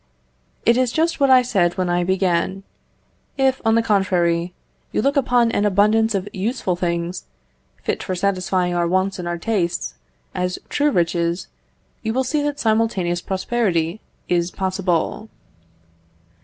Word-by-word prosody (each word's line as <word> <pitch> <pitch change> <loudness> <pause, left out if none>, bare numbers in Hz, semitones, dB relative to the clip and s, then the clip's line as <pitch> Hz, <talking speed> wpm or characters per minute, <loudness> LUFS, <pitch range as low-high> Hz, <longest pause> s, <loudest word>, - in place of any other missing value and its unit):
It 235 +1 +5
is 255 -2 +2
just 330 +3 0
what 275 -1 +4
I 255 -1 +7
said 190 -7 +1
when 185 -1 0
I 175 0 +1
began. 190 +1 0 0.7
If, 265 -1 +2
on 225 0 +3
the 230 - +3
contrary, 180 -5 +1 0.4
you - - -1
look 275 +6 +1
upon 245 -4 +3
an 205 - 0
abundance 210 +2 +3
of 195 0 -2
useful 195 -1 -1
things, 170 0 -2 0.6
fit - - -2
for 185 - -3
satisfying 185 -1 0
our 175 -1 +1
wants 185 +2 0
and 175 - -4
our 175 0 -2
tastes, 175 - -1 0.4
as 180 0 -2
true 290 +1 +2
riches, 170 - 0 0.5
you 220 0 -2
will 260 - +2
see 295 +4 0
that 290 0 -2
simultaneous 215 -6 +1
prosperity 190 -3 -1 0.3
is 175 -1 +1
possible. 190 +2 -1
190 Hz, 145 wpm, -21 LUFS, 175-230 Hz, 0.7 s, I